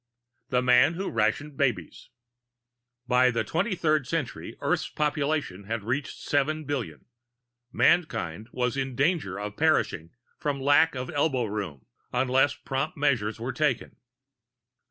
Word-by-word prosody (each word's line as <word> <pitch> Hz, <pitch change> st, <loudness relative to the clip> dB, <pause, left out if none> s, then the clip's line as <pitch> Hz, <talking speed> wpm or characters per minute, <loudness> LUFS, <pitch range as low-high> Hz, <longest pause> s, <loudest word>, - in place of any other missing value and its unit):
] 120 Hz, +2 st, -51 dB
THE 125 Hz, -1 st, +2 dB
MAN 125 Hz, +6 st, +5 dB
WHO 195 Hz, +3 st, -3 dB
RATIONED 115 Hz, +6 st, 0 dB
BABIES 120 Hz, -, -1 dB, 1.0 s
By 125 Hz, 0 st, +4 dB
the 115 Hz, -2 st, 0 dB
23rd 160 Hz, -, 0 dB
century 160 Hz, -3 st, -4 dB
Earth's -, -, 0 dB
population 150 Hz, -, -1 dB
had 115 Hz, 0 st, -3 dB
reached 130 Hz, +7 st, -2 dB
seven 155 Hz, +2 st, 0 dB
billion. 115 Hz, -, -4 dB, 0.7 s
Mankind 110 Hz, -, +1 dB
was 125 Hz, -1 st, -1 dB
in 135 Hz, -2 st, -2 dB
danger 145 Hz, -, +1 dB
of 105 Hz, 0 st, -6 dB
perishing 150 Hz, -, +1 dB, 0.3 s
for 145 Hz, -1 st, -1 dB
lack 145 Hz, +3 st, +4 dB
of 125 Hz, 0 st, -4 dB
elbow 140 Hz, -4 st, +1 dB
room 100 Hz, -, -5 dB, 0.3 s
unless 130 Hz, +1 st, +2 dB
prompt 135 Hz, +6 st, -3 dB
measures 120 Hz, -7 st, +1 dB
were 120 Hz, +3 st, -3 dB
taken. 140 Hz, -1 st, -1 dB
130 Hz, 130 wpm, -27 LUFS, 115-150 Hz, 1.0 s, MAN